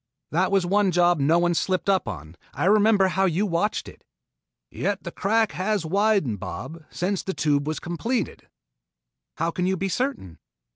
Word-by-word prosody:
That 180 Hz, +5 st, +1 dB
was 195 Hz, -2 st, +2 dB
one 200 Hz, +2 st, +2 dB
job 175 Hz, -1 st, +3 dB
no 150 Hz, +5 st, +3 dB
one 175 Hz, 0 st, +2 dB
slipped 185 Hz, +3 st, -1 dB
up 195 Hz, -1 st, +2 dB
on. 80 Hz, +3 st, -7 dB, 0.2 s
I -, -, -1 dB
remember 205 Hz, -1 st, +4 dB
how 190 Hz, +1 st, +1 dB
you 185 Hz, +3 st, +1 dB
watched 195 Hz, +3 st, -1 dB
it -, -, -13 dB, 0.4 s
" -, -, -63 dB, 0.3 s
"Yet 200 Hz, -1 st, -2 dB
the 170 Hz, -, -6 dB
crack 220 Hz, +4 st, +1 dB
has 195 Hz, -1 st, -1 dB
widened, 195 Hz, -, +1 dB
Bob, 130 Hz, -, -7 dB
since 190 Hz, +2 st, -2 dB
the 190 Hz, -, -4 dB
Tube 145 Hz, -1 st, +1 dB
was 155 Hz, -, -2 dB
completed." 200 Hz, +5 st, -3 dB, 0.9 s
"How 165 Hz, -, 0 dB
can 180 Hz, +1 st, -1 dB
you 190 Hz, 0 st, 0 dB
be 195 Hz, +2 st, -2 dB
certain?" 245 Hz, -, -3 dB
185 Hz, 180 wpm, -24 LUFS, 165-200 Hz, 0.9 s, remember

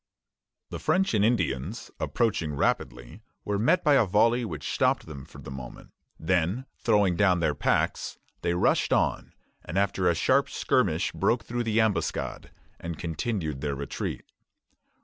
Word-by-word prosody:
The -, -, -5 dB
French 190 Hz, -3 st, +1 dB
and 105 Hz, -2 st, +3 dB
Indians, 100 Hz, -, -1 dB
approaching 90 Hz, -10 st, 0 dB
rapidly, 60 Hz, -3 st, -2 dB, 0.2 s
were 100 Hz, -1 st, -1 dB
met 125 Hz, -, +3 dB
by 150 Hz, -3 st, +4 dB
a 135 Hz, -, +6 dB
volley 115 Hz, +5 st, +3 dB
which 80 Hz, -10 st, -4 dB
stopped -, -, +1 dB
them 70 Hz, -4 st, -9 dB
for -, -, -15 dB
the -, -, -9 dB
moment; 65 Hz, -2 st, -9 dB, 0.3 s
then, 90 Hz, +8 st, 0 dB
throwing 105 Hz, -5 st, +3 dB
down 90 Hz, -1 st, +3 dB
their 85 Hz, -, +1 dB
packs, -, -, 0 dB, 0.2 s
they 85 Hz, -, 0 dB
rushed 90 Hz, -, +2 dB
on, -, -, +1 dB, 0.3 s
and 85 Hz, -, -5 dB
after 100 Hz, -1 st, +2 dB
a -, -, +2 dB
sharp -, -, +2 dB
skirmish -, -, +1 dB
broke 115 Hz, -1 st, +1 dB
through 120 Hz, 0 st, -3 dB
the 110 Hz, 0 st, +1 dB
ambuscade 110 Hz, -3 st, -1 dB, 0.3 s
and 85 Hz, -1 st, -5 dB
continued 80 Hz, -, -3 dB
their 70 Hz, -2 st, -2 dB
retreat. 70 Hz, 0 st, -5 dB
95 Hz, 150 wpm, -27 LUFS, 80-115 Hz, 0.3 s, a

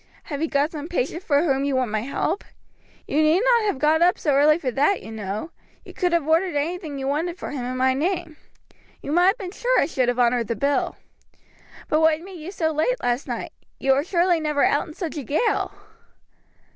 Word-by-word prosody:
Have 290 Hz, -2 st, -5 dB
you 325 Hz, -, +1 dB
got 290 Hz, +1 st, +1 dB
some 305 Hz, -2 st, -6 dB
patient 335 Hz, 0 st, -2 dB
for 290 Hz, -4 st, +2 dB
whom 275 Hz, -4 st, +1 dB
you 280 Hz, -1 st, 0 dB
want 255 Hz, -4 st, 0 dB
my 215 Hz, -, 0 dB
help? 280 Hz, -, -2 dB, 0.6 s
You 300 Hz, -, +1 dB
need 310 Hz, +5 st, +4 dB
not 475 Hz, -2 st, +3 dB
have 405 Hz, -9 st, 0 dB
got 305 Hz, +4 st, +2 dB
up 355 Hz, +1 st, +4 dB
so 295 Hz, -, 0 dB
early 295 Hz, +3 st, +5 dB
for 270 Hz, -7 st, -2 dB
that, 295 Hz, +10 st, +1 dB
you 220 Hz, -, -9 dB
know. 215 Hz, -, -5 dB, 0.3 s
You -, -, -11 dB
could 360 Hz, -2 st, 0 dB
have 335 Hz, -3 st, +1 dB
ordered 330 Hz, +2 st, +2 dB
anything 310 Hz, 0 st, -2 dB
you 270 Hz, 0 st, -3 dB
wanted 330 Hz, +5 st, -1 dB
for -, -, -6 dB
him 275 Hz, -4 st, -4 dB
in 255 Hz, +1 st, -3 dB
my 260 Hz, 0 st, +3 dB
name. 335 Hz, +2 st, -2 dB, 0.7 s
You 285 Hz, -, -4 dB
might 350 Hz, +3 st, +4 dB
have 390 Hz, +5 st, +3 dB
been 380 Hz, -6 st, -6 dB
sure -, -, +1 dB
I -, -, +3 dB
should 260 Hz, -5 st, 0 dB
have 245 Hz, 0 st, 0 dB
honored 240 Hz, -2 st, +2 dB
the 230 Hz, -, -1 dB
bill. 280 Hz, +3 st, 0 dB, 0.9 s
But 310 Hz, -, +2 dB
what 315 Hz, -1 st, +4 dB
made 365 Hz, +1 st, -10 dB
you 320 Hz, +4 st, -7 dB
so 320 Hz, -5 st, -1 dB
late 315 Hz, +12 st, 0 dB
last 245 Hz, +2 st, 0 dB
night? -, -, -5 dB, 0.3 s
You 270 Hz, 0 st, +3 dB
were 275 Hz, +2 st, +1 dB
surely 345 Hz, 0 st, +2 dB
never 300 Hz, -2 st, 0 dB
out 290 Hz, -, +1 dB
in 310 Hz, -, -11 dB
such 330 Hz, -4 st, -5 dB
a 290 Hz, -, -4 dB
gale!" 310 Hz, -, 0 dB
310 Hz, 225 wpm, -23 LUFS, 275-345 Hz, 0.9 s, early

